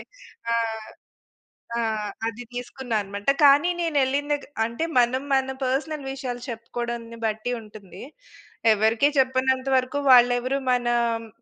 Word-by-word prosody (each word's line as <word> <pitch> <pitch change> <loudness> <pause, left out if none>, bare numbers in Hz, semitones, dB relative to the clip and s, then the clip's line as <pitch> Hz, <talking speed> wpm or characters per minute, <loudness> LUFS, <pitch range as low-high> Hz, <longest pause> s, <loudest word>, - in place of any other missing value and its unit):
ఎ - - -8 0.5
ఆ! - - +2 1.2
ఆ! - - +1 0.5
అది 230 +2 -4
తీసుకున్నానమాట. 220 -4 -4 0.2
కానీ 285 +5 +6
నేనేళ్ళిన 290 -3 0
దెగ్ 290 - -2 0.2
అంటే 235 +8 -3
మనం 245 +2 +2
మన 265 0 +1
పర్సనల్ 280 +3 -2
విషయాలు 255 -3 -5
చెప్పుకోడంని 235 0 -5
బట్టి 220 +2 -2
ఉంటుంది, 205 -4 -12 0.7
ఎవరికీ 220 +6 +3
చెప్పనంత 260 0 +2
వరకు, 255 +2 0
వాళ్ళెవరూ 245 +2 +4
మనా 240 -1 +1 0.2
హ్మ్, 225 0 -11
245 Hz, 115 wpm, -24 LUFS, 230-265 Hz, 1.2 s, కానీ